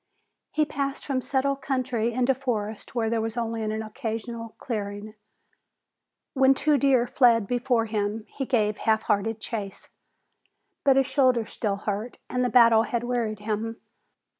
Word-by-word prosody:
He 305 0 +1
passed 280 -1 -3
from 265 -3 -1
settled 275 +1 0
country 255 -4 -1
into 250 +2 +2
forest 225 -5 -4
where 230 -2 +1
there 225 0 0
was 225 +1 -4
only 230 -1 -2
an 220 0 -2
occasional 225 +1 -5
clearing. 205 -2 -5 1.2
When 270 0 +5
two 295 +1 +2
deer 260 -2 +4
fled 235 -4 +4
before 245 0 +1
him 215 0 -2
he 270 -2 -3
gave 215 -4 +1
halfhearted 220 0 +1
chase. 210 -3 -6 0.9
But 275 -2 +5
his 270 0 +4
shoulder 255 -4 +3
still 210 -1 -2
hurt 205 +3 -4
and 250 0 +1
the 250 - +1
battle 230 -3 +6
had 235 0 -2
wearied 235 -4 -2
him. 220 +2 -3
230 Hz, 145 wpm, -26 LUFS, 220-255 Hz, 1.2 s, battle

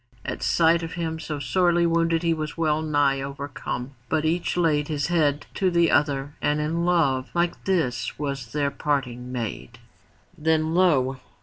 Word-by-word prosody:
At - - -4
sight 170 0 +3
of 165 0 -5
him 160 -2 -3
so 155 -1 -4
sorely 170 +5 +2
wounded 165 0 +2
he 165 -1 +2
was 155 0 -4
well 155 -2 +1
nigh 145 -3 +1
overcome. 140 -2 -5 0.2
But 160 -1 +1
each 170 +2 0
laid 150 -4 +2
his 150 0 -2
head 150 -4 +1
to 190 -2 +1
the 170 -1 +3
other 145 -1 +1
and 145 +1 +1
in 165 +3 -1
love 140 -7 +2
like 170 0 0
this 160 -11 0
was 140 -5 -4
their 145 -1 0
parting 125 -5 -2
made. 115 -1 -5 0.6
Then 160 0 +1
lo! 135 -8 +3
155 Hz, 165 wpm, -24 LUFS, 140-165 Hz, 0.6 s, sight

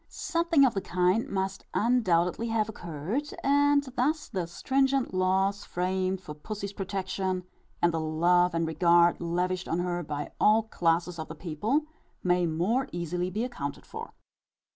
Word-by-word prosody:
_ - - -38
Something 335 -4 +2
of 250 - +2
the 195 - -1
kind 180 +5 +1
must 190 0 -2
undoubtedly 215 -3 +2
have 225 -2 +1
occurred; 195 - -4
and 285 +1 +4
thus 300 +5 0
the 185 -6 -2
stringent 270 +7 +1
laws 190 +2 +1
framed 185 +1 -1
for 150 - -8
pussy's 200 +6 -6
protection, 190 -1 -2 0.4
and 170 -1 +4
the 165 - 0
love 170 +3 +2
and 165 0 +1
regard, 170 +2 +4
lavished 180 +2 -1
on 165 - -1
her 175 0 -1
by 145 -2 -5
all 220 +1 +5
classes 170 -4 0
of 160 - -4
the 160 - -8
people, 190 - -1 0.4
may 180 -1 +2
more 210 - 0
easily 175 +1 -2
be 210 +5 -2
accounted 145 - -5
for. - - -8
185 Hz, 155 wpm, -28 LUFS, 170-220 Hz, 0.4 s, all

